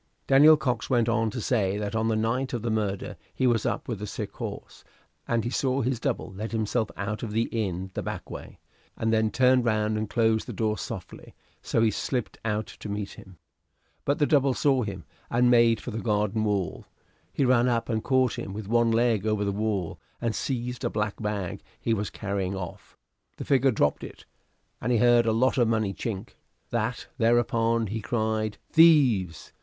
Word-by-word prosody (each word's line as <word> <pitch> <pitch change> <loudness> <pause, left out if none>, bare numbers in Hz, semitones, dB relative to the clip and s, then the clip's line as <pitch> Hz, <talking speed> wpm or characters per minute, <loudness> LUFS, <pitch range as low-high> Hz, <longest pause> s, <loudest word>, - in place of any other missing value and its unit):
Daniel 150 +3 +7
Cox 125 -6 -2
went 120 -3 +2
on 115 -1 +1
to 115 - -5
say 100 -4 0
that 105 +1 -3
on 110 0 +1
the 110 - +1
night 115 +5 -1
of 120 -2 -3
the 115 - -1
murder 105 -3 -2 0.2
he 130 - 0
was 120 -3 +2
up - - -2
with 110 -5 -4
a 105 - -4
sick - - -5
horse, - - -8 0.4
and 115 -1 +1
he 120 - -3
saw 130 +1 0
his 125 -1 -1
double - - -2
let 105 +4 -5
himself 110 0 0
out 105 +1 -3
of 110 -3 -5
the 115 +1 +2
inn 95 -4 -2
the - - -3
back - - -5
way, - - -9 0.4
and 110 0 0
then 110 0 +3
turn 125 +2 +4
round 110 -2 0
and 110 -1 -3
close 110 -1 +2
the - - -7
door 110 -1 0
softly; - - -8 0.3
so 115 - +1
he 110 - +3
slipped 125 +3 -3
out 110 -1 -1
to 105 - -10
meet 100 -1 -4
him. 95 -2 -14 0.7
But 140 +2 +1
the 150 - +3
double 140 -3 +3
saw 135 -3 +2
him, 100 -5 -5 0.3
and 120 +1 +3
made 115 -2 +5
for 125 - -6
the 110 - -4
garden 105 0 0
wall. 100 -5 -2 0.4
He 135 - +1
ran 125 -1 +4
up 115 -2 0
and 110 -2 -1
caught 130 -3 +2
him 95 - -6
with 105 -1 -6
one 115 +1 +3
leg 115 -2 +2
over 105 -1 +1
the 100 - 0
wall, 100 -4 -2 0.2
and 115 -2 -1
seized 125 -1 -3
a - - +1
black 105 0 -3
bag 105 -4 -3 0.2
he 115 - 0
was 105 -2 -2
carrying 100 -2 -3
off; 90 -3 -8 0.4
the - - -6
figure 135 -1 +3
dropped 75 - +1
it, - - -10 0.6
and 125 - -1
he 120 - +3
heard 120 0 +4
a - - +4
lot 130 +4 +2
Of 120 - +4
money 110 -3 0
chink: 100 -2 -5 0.4
that 115 +1 -2
thereupon 115 0 +2
he 110 +2 -4
cried 110 -1 -1
"Thieves!" 130 - +4
110 Hz, 200 wpm, -26 LUFS, 105-120 Hz, 0.7 s, Daniel